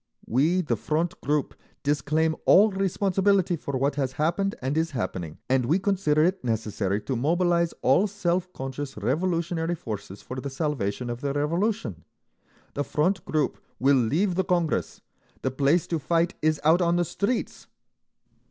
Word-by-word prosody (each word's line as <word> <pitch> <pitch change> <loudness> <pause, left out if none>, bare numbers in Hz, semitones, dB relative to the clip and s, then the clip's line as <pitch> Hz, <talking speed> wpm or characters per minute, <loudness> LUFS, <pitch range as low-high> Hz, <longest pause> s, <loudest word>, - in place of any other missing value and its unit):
"We, 155 +10 +2
the 135 -9 0
Front 155 +9 -2
group, 145 +1 0 0.3
disclaim 150 +3 +1
all 210 +3 +6
responsibility 195 -1 +1
for 140 -4 -4
what 140 +2 +1
has 135 -2 -1
happened 175 +8 0
and 130 +3 -2
is 160 +1 +1
happening, 90 -6 -4
and 130 -2 +2
we 160 +7 +3
consider 185 -6 +2
it 185 0 +1
necessary 105 -4 -1
to 130 - -3
mobilise 170 +5 +2
all 175 +11 +4
self 185 -2 -1
conscious 135 -1 -6
revolutionary 165 - 0
forces 105 - -7
for 130 +1 -6
the 140 - -4
salvation 130 -5 -2
of 120 +1 -6
the 140 -1 -1
Revolution! 150 - -1 0.7
The 145 - -1
Front 180 +8 0
group 155 -2 0 0.2
will 140 +2 +4
leave 150 - +2
the 190 +2 +1
Congress…. 175 -3 -1 0.4
The 130 - 0
place 140 +6 +2
to 165 - -2
fight 170 +4 +1
is 155 -1 +2
out 160 +4 +5
on 170 0 +2
the 175 0 +2
streets!" 205 +9 -2
155 Hz, 155 wpm, -26 LUFS, 130-175 Hz, 0.7 s, all